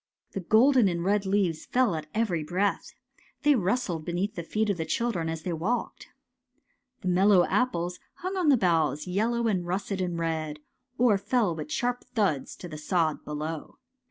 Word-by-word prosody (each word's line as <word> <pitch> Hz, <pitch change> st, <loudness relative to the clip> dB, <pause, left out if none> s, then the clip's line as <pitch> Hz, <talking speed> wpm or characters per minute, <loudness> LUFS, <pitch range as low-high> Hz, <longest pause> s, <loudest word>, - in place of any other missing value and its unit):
The -, -, -4 dB
golden 230 Hz, +5 st, +5 dB
and 170 Hz, -2 st, -1 dB
red 200 Hz, 0 st, +1 dB
leaves 190 Hz, -5 st, 0 dB
fell 250 Hz, -5 st, +2 dB
at 155 Hz, -2 st, -4 dB
every 195 Hz, -8 st, 0 dB
breath. 185 Hz, +6 st, -1 dB, 0.5 s
They 295 Hz, 0 st, +6 dB
rustled 195 Hz, -, 0 dB
beneath 180 Hz, +5 st, -2 dB
the 170 Hz, -, -4 dB
feet 215 Hz, +5 st, 0 dB
of 195 Hz, -, -3 dB
the 160 Hz, -, -1 dB
children 175 Hz, -2 st, -1 dB
as 160 Hz, -1 st, -4 dB
they 180 Hz, -, -2 dB
walked. 190 Hz, +10 st, -2 dB, 0.9 s
The -, -, -5 dB
mellow 185 Hz, 0 st, +5 dB
apples 180 Hz, -8 st, 0 dB, 0.2 s
hung 370 Hz, +2 st, -4 dB
on 360 Hz, -5 st, +2 dB
the 275 Hz, -, +6 dB
boughs, 160 Hz, -, +1 dB
yel 200 Hz, +5 st, 0 dB
low 235 Hz, 0 st, 0 dB
and 195 Hz, -5 st, +1 dB
russet 190 Hz, +2 st, -2 dB
and 175 Hz, -2 st, -2 dB
red, 160 Hz, -2 st, -2 dB, 0.4 s
or 225 Hz, -5 st, +4 dB
fell 205 Hz, -2 st, +1 dB
with 225 Hz, -, -6 dB
sharp 245 Hz, -4 st, -1 dB
thuds 190 Hz, -, 0 dB
to 180 Hz, -, -9 dB
the 155 Hz, -3 st, -8 dB
sod 160 Hz, -1 st, 0 dB
below. 150 Hz, +1 st, -5 dB
185 Hz, 180 wpm, -27 LUFS, 165-220 Hz, 0.9 s, They